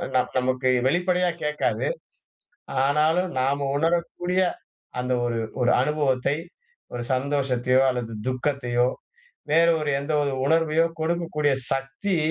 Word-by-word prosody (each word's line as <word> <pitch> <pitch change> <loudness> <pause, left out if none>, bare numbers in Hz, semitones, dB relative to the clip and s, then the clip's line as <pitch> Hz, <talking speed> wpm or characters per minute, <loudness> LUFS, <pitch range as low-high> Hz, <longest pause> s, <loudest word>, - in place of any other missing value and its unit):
நம் 125 - +1
நமக்கு 130 0 +1 0.2
வெளிப்படையா 180 +3 +2
கேட்காது. 150 0 0 1.0
ஆனாலும் 160 +5 +2
நாம 140 +1 0
உணரக்கூடிய 175 +3 0 0.6
அந்த 125 0 -1
ஒரு 115 -1 -1 0.2
ஒரு 125 - +4
அனுபவத்தை, 140 -2 +1 0.6
ஒரு 120 0 -3
சந்தோஷத்தையோ 130 -2 +1
அல்லது 120 -3 -3 0.2
துக்கத்தையோ 125 -2 0 0.7
வேறு 170 +1 +5
ஒரு 150 -1 -1
எந்த 150 +2 -3
ஒரு 140 -1 -1
உணர்வையோ 165 +1 +3
கொடுக்கக்கூடிய 160 -3 0 0.2
சக்தி 135 +8 -2
145 Hz, 105 wpm, -24 LUFS, 130-165 Hz, 1.0 s, வேறு